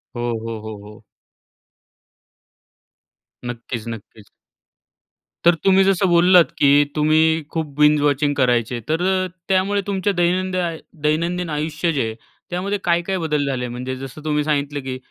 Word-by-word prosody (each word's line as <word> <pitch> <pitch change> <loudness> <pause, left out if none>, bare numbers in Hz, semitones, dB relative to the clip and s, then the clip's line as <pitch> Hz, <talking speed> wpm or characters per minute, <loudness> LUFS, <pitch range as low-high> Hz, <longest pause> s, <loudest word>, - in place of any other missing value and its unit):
हो, 120 - -4 0.2
हो, 115 -1 -5
हो, 110 0 -7
हो. 105 +1 -14 2.4
नक्कीच, 120 -1 -6
नक्कीच. 110 -1 -9 1.2
तर 175 0 +6
तुम्ही 195 0 +5
जसं 195 0 +2
बोललात 175 0 +5
की 140 - +4 0.3
तुम्ही 160 +1 +3
खूप 160 -1 -2
बिंज 150 0 +5
वॉचिंग 145 0 +1
करायचे, 120 -2 +1
तर 160 +2 0 0.2
अ, - - -4 0.2
त्यामुळे 195 +1 +1
तुमच्या 200 0 0
दैनंदिन 180 -1 0 0.2
दैनंदिन 170 +3 0
आयुष्य 155 +2 -1
जे 140 - 0
आहे 110 - -5 0.3
त्यामध्ये 190 +3 -2
काय-काय 175 +2 0
बदल 150 -4 -1
झाले 130 -3 -2
म्हणजे 125 +2 -5
जसं 135 +3 -9
तुम्ही 150 -1 +1
सांगितलं 145 -1 -1
की 130 -1 -4
155 Hz, 135 wpm, -20 LUFS, 130-175 Hz, 2.4 s, तर